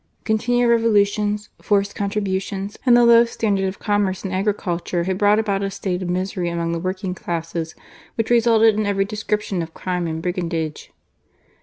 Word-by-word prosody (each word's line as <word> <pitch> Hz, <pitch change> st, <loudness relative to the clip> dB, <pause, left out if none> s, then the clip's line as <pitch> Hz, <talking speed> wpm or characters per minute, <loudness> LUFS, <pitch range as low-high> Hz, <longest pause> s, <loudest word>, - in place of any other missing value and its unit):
Continual 240 Hz, +2 st, +1 dB
Revo 230 Hz, 0 st, +1 dB
^ 205 Hz, 0 st, +3 dB
Intibnsi 210 Hz, 0 st, -2 dB
jfbrced 200 Hz, -1 st, +1 dB
contributions, 200 Hz, 0 st, -3 dB
and 240 Hz, -1 st, +7 dB
the 240 Hz, -, +5 dB
low 235 Hz, 0 st, +7 dB
standard 210 Hz, -4 st, -1 dB
of 190 Hz, +1 st, -3 dB
commerce 205 Hz, -3 st, 0 dB
and 190 Hz, -1 st, -4 dB
agricnltore 185 Hz, -3 st, -1 dB
had 190 Hz, 0 st, -2 dB
brought 205 Hz, 0 st, +4 dB
about 200 Hz, -3 st, 0 dB
a 195 Hz, -, -1 dB
state 190 Hz, -2 st, -3 dB
of 180 Hz, -, -3 dB
misery 180 Hz, 0 st, -2 dB
among 170 Hz, 0 st, -2 dB
the 170 Hz, -, -2 dB
working 185 Hz, +1 st, -3 dB
classes 165 Hz, -2 st, -4 dB, 0.4 s
which 225 Hz, 0 st, -2 dB
resulted 225 Hz, -2 st, +5 dB
in 210 Hz, 0 st, -1 dB
every 195 Hz, -1 st, +1 dB
description 210 Hz, -2 st, -2 dB
of 165 Hz, 0 st, -7 dB
crime 180 Hz, -2 st, -2 dB
and 160 Hz, 0 st, -3 dB
brigandage. 165 Hz, -4 st, -3 dB
195 Hz, 175 wpm, -21 LUFS, 180-210 Hz, 0.4 s, and